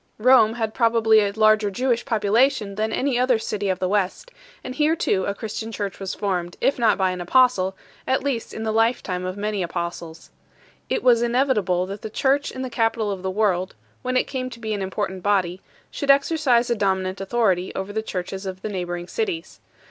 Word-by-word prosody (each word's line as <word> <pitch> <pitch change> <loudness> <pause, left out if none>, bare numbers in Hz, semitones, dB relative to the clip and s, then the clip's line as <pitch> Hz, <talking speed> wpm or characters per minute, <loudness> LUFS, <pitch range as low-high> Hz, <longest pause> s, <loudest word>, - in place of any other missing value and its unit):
Rome 225 -1 +5
had 220 -2 -2
probably 225 -2 +4
a 205 -1 +1
larger 215 0 +3
Jewish 240 +3 0
population 220 -2 +2
than 215 +2 -2
any 260 +1 0
other 250 -1 +3
city 210 -2 -3
of 185 - 0
the 185 - -1
West, 205 - -1 0.3
and 255 - -5
here 305 +3 +2
too 190 - 0
a 200 - -2
Christian 220 +1 -5
church 205 -3 -4
was 195 -1 -4
formed, 180 -4 -2
if 275 - +1
not 230 -2 +3
by 190 -2 +1
an 180 -1 -5
Apostle, 190 -2 +3 0.3
at 260 0 +1
least 265 -5 -2
in 220 - -6
the 220 -1 -1
lifetime 225 -5 0
of 185 +1 -4
many 210 -1 -2
Apostles. 170 -2 -5 0.6
It - - -1
was 240 -2 +5
inevitable 235 -8 +1
that 200 +2 -7
the 220 - -6
church 275 +6 +1
in 260 - -6
the 260 - -4
capital 225 -3 0
of 195 -2 -5
the 190 - -2
world, 190 -2 0 0.3
when 255 0 0
it - - +3
came 255 -2 -4
to 235 -2 -11
be 220 -2 -3
an 205 - -3
important 190 0 -3
body, 190 -2 0 0.3
should 285 - -5
exercise 275 -4 +3
a - - +3
dominant 190 -2 -1
authority 195 -3 +1
over 190 +1 -4
the 220 - -1
churches 190 -1 -5
of 185 0 -7
the 215 - -3
neighbouring 175 -3 -4
cities. 385 - -4
215 Hz, 200 wpm, -23 LUFS, 190-240 Hz, 0.6 s, Rome